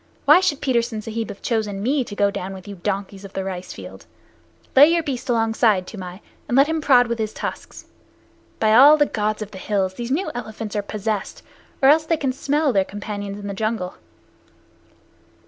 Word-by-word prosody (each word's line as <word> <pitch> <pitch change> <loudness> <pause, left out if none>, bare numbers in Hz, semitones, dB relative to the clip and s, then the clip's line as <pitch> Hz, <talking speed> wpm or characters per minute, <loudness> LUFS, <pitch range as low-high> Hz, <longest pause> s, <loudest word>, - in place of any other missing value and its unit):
Why 300 +4 +8
should 310 -7 0
Petersen 235 -3 0
Sahib 225 0 -4
have 200 - -9
chosen 210 -4 -1
me 270 +3 +1
to 205 - -8
go 200 0 +2
down 190 0 -5
with 190 +1 -12
you 200 -1 -8
donkeys 195 +1 -4
of 195 - -11
the 190 - -3
rice 185 -1 -6
fields? - - -11 0.7
Lay 280 +3 +9
your 335 - +1
beast 265 -4 -5
alongside, 225 -4 +2
Toomai, 185 -1 -8 0.3
and 245 - +1
let 275 - +7
him 320 +1 -2
prod 250 -4 +5
with 235 -1 -3
his 220 -1 -2
tusks. - - -7 0.7
By 215 -1 +3
all 285 +6 +8
the 295 - +4
Gods 215 -3 -2
of 210 - -12
the 190 - -9
Hills, 190 -2 -1
these 235 +4 -6
new 315 +9 -1
elephants 220 -2 -6
are 205 - +1
possessed, 210 0 -4 0.4
or 270 - +7
else 315 +2 +4
they 330 - +2
can 270 -3 -1
smell 285 +1 0
their 195 -2 +3
companions 205 0 -6
in 205 - -9
the 200 - -4
jungle." 215 -3 -2
220 Hz, 200 wpm, -22 LUFS, 200-260 Hz, 0.7 s, Lay